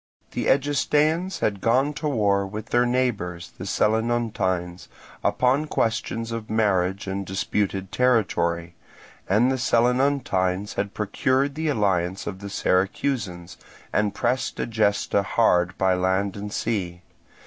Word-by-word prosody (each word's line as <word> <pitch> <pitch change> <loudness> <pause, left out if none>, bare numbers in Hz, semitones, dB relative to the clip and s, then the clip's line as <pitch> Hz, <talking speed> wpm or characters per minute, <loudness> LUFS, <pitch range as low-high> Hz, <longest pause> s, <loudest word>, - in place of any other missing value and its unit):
The - - -2
Egestaeans 150 +6 +1
had 100 -2 0
gone 130 +6 +2
to 150 - -3
war 100 -7 +1
with 105 +3 -7
their 120 0 +3
neighbours 105 -9 -1
the 95 - -5
Selinuntines 105 -5 0 0.4
upon 135 +5 +2
questions 115 -2 -1
of 115 -1 -5
marriage 100 -3 +1
and 100 0 -3
disputed 95 0 -2
territory, 90 -8 +1 0.6
and 115 +7 +4
the 130 - -1
Selinuntines 120 -6 +1
had 100 0 -3
procured 130 +6 0
the 160 +2 -3
alliance 95 -7 0
of 95 -2 -5
the 100 0 -7
Syracusans, 95 -2 -1 0.4
and 105 -1 +1
pressed 125 +1 -1
Egesta 105 -3 +1
hard 90 -4 +2
by 95 -1 +3
land 95 +2 0
and 105 0 -6
sea. 90 -6 -2
105 Hz, 125 wpm, -24 LUFS, 95-125 Hz, 0.6 s, and